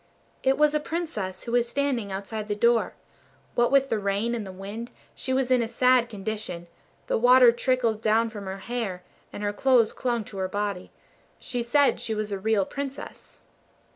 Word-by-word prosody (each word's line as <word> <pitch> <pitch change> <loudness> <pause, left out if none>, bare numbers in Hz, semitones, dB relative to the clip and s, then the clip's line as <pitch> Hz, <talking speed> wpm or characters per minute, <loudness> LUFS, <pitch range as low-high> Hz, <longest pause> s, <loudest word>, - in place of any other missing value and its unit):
It 265 0 +2
was 300 0 +4
a 300 - +2
Princess 290 - -4
who 235 - -5
was 240 0 +2
standing 250 -6 -1
outside 210 +2 -5
the 205 - -1
door. 235 +2 +2 0.6
What 240 +1 +2
with 275 -1 +4
the 220 - 0
rain 200 +4 0
and 220 -4 -4
the - - -7
wind, 200 +5 -7 0.2
she 260 - -5
was 260 -1 +1
in 250 -1 +4
a 230 - -1
sad 250 +1 +3
condition; 205 -4 -4 0.4
the - - 0
water 250 0 +7
trickled 240 -3 0
down 225 +1 +2
from 205 -3 -8
her 190 0 -5
hair, 220 -7 -3 0.3
and 205 - -7
her 205 0 -1
clothes 245 -1 +3
clung 240 -3 -1
to 200 - -11
her 185 0 -1
body. 200 -2 -3 0.5
She 245 -1 -4
said 280 +4 +3
she 220 - -3
was 215 -1 -3
a 200 - -2
real 210 -1 +1
Princess. 275 +2 -8
230 Hz, 190 wpm, -26 LUFS, 205-255 Hz, 0.6 s, water